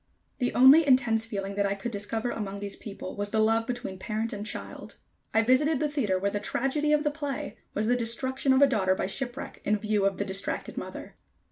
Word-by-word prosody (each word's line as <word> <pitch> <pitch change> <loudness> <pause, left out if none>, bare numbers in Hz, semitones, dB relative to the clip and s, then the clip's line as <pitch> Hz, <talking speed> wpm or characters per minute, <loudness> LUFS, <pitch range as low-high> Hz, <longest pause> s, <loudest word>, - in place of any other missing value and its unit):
The 245 - +1
only 270 +6 +8
intense 240 -4 +3
feeling 200 -2 -4
that 200 0 +1
I 200 - -1
could 220 +4 -5
discover 220 +3 -2
among 200 -2 -4
these 200 0 -5
people 200 -3 -8
was 205 0 -3
the 220 - -1
love 225 +1 +2
between 240 -6 -4
parent 220 +2 -3
and 205 0 -5
child. 215 - -6 0.4
I 225 - +3
visited 265 +5 +3
the 305 - +1
theater 255 -11 0
where 200 +2 0
the 205 - -2
tragedy 270 +7 0
of 300 0 +3
the 295 - +1
play 290 -3 -4 0.2
was 210 - 0
the 245 +3 +3
destruction 260 +3 0
of 265 +2 +6
a - - +7
daughter 190 -6 +2
by - - -2
shipwreck 245 +6 -5
in 210 +1 +2
view 210 -1 0
of 195 - -2
the 200 - -1
distracted 195 0 -3
mother. - - -7
225 Hz, 220 wpm, -28 LUFS, 200-260 Hz, 0.4 s, only